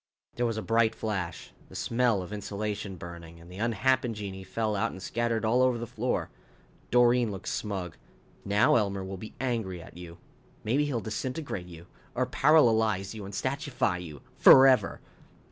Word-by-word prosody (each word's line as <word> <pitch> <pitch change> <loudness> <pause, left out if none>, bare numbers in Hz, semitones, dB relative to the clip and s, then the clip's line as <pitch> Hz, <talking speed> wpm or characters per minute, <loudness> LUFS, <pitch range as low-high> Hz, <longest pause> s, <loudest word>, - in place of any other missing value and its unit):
There 120 0 0
was 115 -1 -2
a 110 - -3
bright 115 0 +2
flash, 95 -6 -4 0.2
the - - -13
smell 115 -5 +1
of 90 - -8
insulation 105 -1 -4
burning, 85 -1 -10
and 85 +2 -14
the 90 - -9
unhappen 120 +1 +1
genii 95 -2 -6
fell 105 +3 -2
out 100 - 0
and - - -9
scattered 115 +3 -1
all 120 +3 +3
over 130 -2 +3
the 120 - -4
floor. 120 +1 -2 0.6
Doreen 120 -1 +4
looked 95 -2 -6
smug. 95 -6 -4 0.5
"Now 100 +3 +4
Elmer 100 -3 -1
will 95 0 -6
be 110 +4 -10
angry 115 -8 -2
at 85 - -13
you. 85 -1 -10 0.5
Maybe 135 +7 +1
he'll 130 -6 -2
disintegrate 110 - -4
you. 85 -1 -12 0.3
Or - - +1
paralalize 110 -10 +3
you 105 -3 -7
and 100 - -9
statuefy 130 - -1
you. 75 -5 -10 0.2
Forever." 130 -1 +7
110 Hz, 165 wpm, -28 LUFS, 95-120 Hz, 0.6 s, Forever